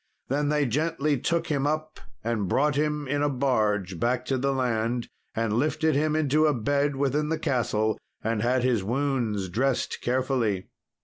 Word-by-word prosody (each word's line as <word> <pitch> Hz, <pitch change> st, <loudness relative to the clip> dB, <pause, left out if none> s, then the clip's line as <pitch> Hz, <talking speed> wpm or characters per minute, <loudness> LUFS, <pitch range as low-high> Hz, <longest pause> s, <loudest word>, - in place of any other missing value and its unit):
Then 145 Hz, +2 st, +1 dB
they 150 Hz, -1 st, +2 dB
gently 150 Hz, +2 st, 0 dB
took 170 Hz, +5 st, 0 dB
him 145 Hz, -4 st, 0 dB
up 155 Hz, +1 st, -2 dB, 0.2 s
and 110 Hz, -3 st, -1 dB
brought 145 Hz, +10 st, +2 dB
him 150 Hz, 0 st, -1 dB
in 145 Hz, +2 st, 0 dB
a 145 Hz, -, +2 dB
barge 105 Hz, -, 0 dB
back 125 Hz, +1 st, 0 dB
to 135 Hz, -, 0 dB
the 140 Hz, +2 st, +1 dB
land, 120 Hz, -2 st, 0 dB, 0.3 s
and 115 Hz, -2 st, 0 dB
lifted 155 Hz, +6 st, +1 dB
him 150 Hz, +2 st, +1 dB
into 155 Hz, 0 st, +3 dB
a 150 Hz, -, +2 dB
bed 140 Hz, +4 st, +1 dB
within 140 Hz, +2 st, 0 dB
the 160 Hz, -, 0 dB
castle, 110 Hz, -6 st, 0 dB, 0.2 s
and 115 Hz, -1 st, 0 dB
had 125 Hz, +2 st, +2 dB
his 120 Hz, -6 st, +2 dB
wounds 120 Hz, -4 st, -1 dB
dressed 130 Hz, +8 st, 0 dB
carefully. 125 Hz, -6 st, 0 dB
135 Hz, 170 wpm, -26 LUFS, 115-150 Hz, 0.3 s, into